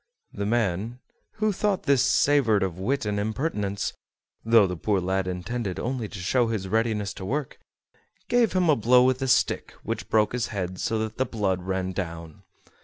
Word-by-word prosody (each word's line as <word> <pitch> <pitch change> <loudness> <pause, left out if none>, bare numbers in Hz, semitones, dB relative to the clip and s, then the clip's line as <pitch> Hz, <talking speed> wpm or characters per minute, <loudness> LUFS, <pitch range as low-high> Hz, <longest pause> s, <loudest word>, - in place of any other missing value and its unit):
The 100 0 -3
man, 110 0 0 0.4
who 215 0 0
thought 200 0 0
this 140 -3 +3
savored 125 -9 +3
of 90 -2 -3
wit 130 +6 -1
and 105 -1 -1
impertinence 105 -3 -2 0.5
(though 115 -2 +5
the 90 -1 -3
poor 100 +4 0
lad 95 +1 -1
intended 95 +2 -3
only 120 -2 -2
to 105 - -9
show 115 +7 +1
his 110 -4 -2
readiness 110 -1 0
to 95 - -9
work), 135 +7 -3 0.7
gave 240 -2 +3
him 185 -2 +2
a 155 - +5
blow 125 +2 +5
with 130 +1 +2
a 135 - 0
stick 130 - +1
which - - -4
broke 110 0 +2
his 120 -5 -1
head 95 -3 -4
so 115 - -1
that 110 +1 -4
the 130 - +2
blood 95 -5 -1
ran 95 0 -2
down. 85 -4 -6
110 Hz, 180 wpm, -26 LUFS, 95-125 Hz, 0.7 s, though